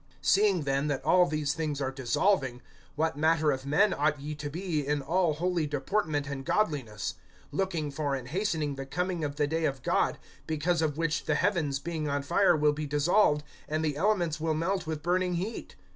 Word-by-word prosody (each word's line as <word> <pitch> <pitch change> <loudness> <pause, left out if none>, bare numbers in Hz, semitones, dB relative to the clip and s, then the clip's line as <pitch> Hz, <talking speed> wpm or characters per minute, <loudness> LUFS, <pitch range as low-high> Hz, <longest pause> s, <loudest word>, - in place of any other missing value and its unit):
(11)Seeing 195 -4 +3
then 140 +1 0
that 145 -3 -2
all 180 -1 +5
these 150 -3 -1
things 150 -3 -2
are 135 -2 -1
dissolving, 130 0 0 0.3
what 160 +1 0
manner 155 0 +3
of 135 0 -4
men 195 +8 +4
ought 145 0 +1
ye 150 +2 -5
to 150 -1 -5
be, 165 0 -2
in 145 +1 0
all 165 +4 +1
holy 175 -1 0
deportment 145 0 -1
and 140 -1 -5
godliness; 135 - -1 0.4
(12)looking 170 -7 -1
for 145 -1 -1
and 130 -2 -6
hastening 160 -4 -1
the 135 0 -6
coming 180 +3 -2
of 145 -1 -2
the 145 0 +1
day 160 +2 -1
of 135 -3 -2
God, - - +1 0.3
because 160 +2 0
of 155 -2 0
which 165 -2 -1
the 155 - +1
heavens 170 -8 +1
being 155 0 -3
on 140 0 -1
fire 175 +3 +3
will 150 0 +3
be 150 0 -4
dissolved, 150 +1 +3 0.3
and 155 +1 0
the 150 -2 0
elements 175 -2 +1
will 160 0 0
melt 180 +2 -1
with 155 -2 -4
burning 180 +1 +1
heat? 195 +7 -4
155 Hz, 195 wpm, -29 LUFS, 145-175 Hz, 0.4 s, all